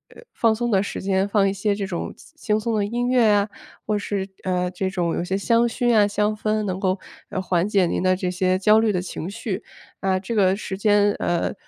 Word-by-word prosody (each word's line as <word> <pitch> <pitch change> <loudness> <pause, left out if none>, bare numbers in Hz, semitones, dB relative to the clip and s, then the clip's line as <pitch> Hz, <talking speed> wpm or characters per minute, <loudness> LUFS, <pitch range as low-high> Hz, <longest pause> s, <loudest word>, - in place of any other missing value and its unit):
呃， - - -14
放 225 -1 +2
松 240 0 -2
的 195 -1 +3
时 200 - -4
间 190 0 +1
放 200 -1 +3
一 195 - 0
些 200 +1 0
这 200 -1 -3
种 180 -3 -4
轻 - - -18
轻 215 -7 0
松 230 +1 -2
的 210 - +1
音 240 +4 -1
乐 245 -3 +4
呀， 205 0 +3 0.4
或 210 - 0
是， 200 -1 -3 0.2
呃， 180 -1 0
这 190 +1 -2
种 175 -3 -1
有 - - -1
些 190 +2 -1
香 230 +3 +2
薰 240 0 +1
啊 205 -1 +5
香 210 +1 0
氛 215 0 -1
能 185 -2 -3
够， 190 -1 0 0.3
呃， - - -3
缓 180 0 0
解 195 -3 +3
您 - - -1
的 185 0 +3
这 180 -1 -2
些 185 0 +1
焦 210 +3 +5
虑 220 -1 +2
的 180 -3 -1
情 175 -1 -6
绪。 205 -1 -4 0.4
啊， 190 -1 +1
这 195 +5 -5
个 195 -3 +3
时 195 -2 -5
间， 205 0 +3
呃， 175 -1 0
200 Hz, 255 characters per minute, -23 LUFS, 185-215 Hz, 0.4 s, 啊